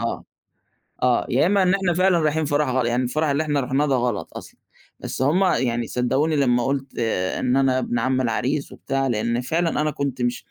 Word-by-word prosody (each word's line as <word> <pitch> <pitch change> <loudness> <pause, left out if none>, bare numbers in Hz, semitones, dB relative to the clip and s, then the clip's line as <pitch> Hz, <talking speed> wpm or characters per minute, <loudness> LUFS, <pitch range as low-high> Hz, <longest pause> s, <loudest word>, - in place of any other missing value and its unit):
آه، - - -3 0.8
آه، - - +2
يا - - +2
إمّا 195 +1 +3
إن 185 +1 +3
إحنا 190 -3 +1
فعلًا 185 0 +3
رايحين 155 0 0
فرح 145 -1 0
غل 130 -1 0
يعني 120 +2 0
الفرح 155 +5 -1
اللي 140 +2 +1
إحنا 145 -2 0
رُحْناه 135 +3 0
ده 140 - +1
غلط 120 -4 -2
أصلًا - - -12 0.4
بس - - -5
هُم 155 +8 +3
يعني 120 -10 0
صدقوني 135 +6 0
لما 125 -4 +2
قُلت 135 0 -1
آآ، 95 -5 -1
إن 125 +1 +1
أنا 130 -1 +2
ابن 120 -1 -2
عم 130 0 0
العريس 130 +4 -1
وبتاع، 135 0 -2
لإن 115 0 -1
فعلًا 165 +4 0
أنا 155 0 0
كنت 140 -3 -3
مش 120 0 -2
135 Hz, 205 wpm, -22 LUFS, 125-155 Hz, 0.8 s, إمّا